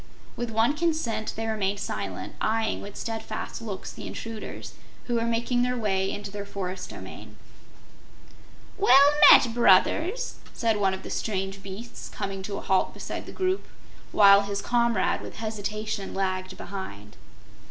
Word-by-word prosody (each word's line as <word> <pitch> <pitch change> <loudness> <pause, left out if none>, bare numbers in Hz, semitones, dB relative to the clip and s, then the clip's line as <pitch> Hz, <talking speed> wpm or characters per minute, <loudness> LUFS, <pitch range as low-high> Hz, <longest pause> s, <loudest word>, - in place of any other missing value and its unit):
With 240 -1 -3
one 225 +6 +2
consent 300 -10 -1
they 225 - -3
remained 205 -3 -1
silent, - - -4
eyeing 220 0 0
with 200 0 -9
steadfast 225 -1 -5
looks 205 -4 -6
the - - -8
intruders, 225 -1 -7 0.3
who 245 - -4
were 230 -1 +1
making 235 +1 +1
their 250 0 0
way 195 -4 0
into 205 -1 -6
their 205 0 -5
forest 185 -2 -5
domain. - - -10 1.4
"Well 280 -6 +7 0.2
met, 235 -3 +8
Brothers!" 315 - +3 0.2
said 225 -2 +1
one 195 -2 +2
of 190 - -10
the - - -7
strange 195 -2 -2
beasts, 200 +5 -8
coming 195 -1 -4
to 200 +1 -4
a - - -5
halt 190 -1 +1
beside - - -6
the - - -7
group, 375 +1 -1 0.4
while 200 -1 +7
his 200 0 -3
comrade 235 -1 +1
with - - -8
hesitation 215 -2 -4
lagged 185 -1 -2
behind. 105 - -7
215 Hz, 150 wpm, -26 LUFS, 195-235 Hz, 1.4 s, met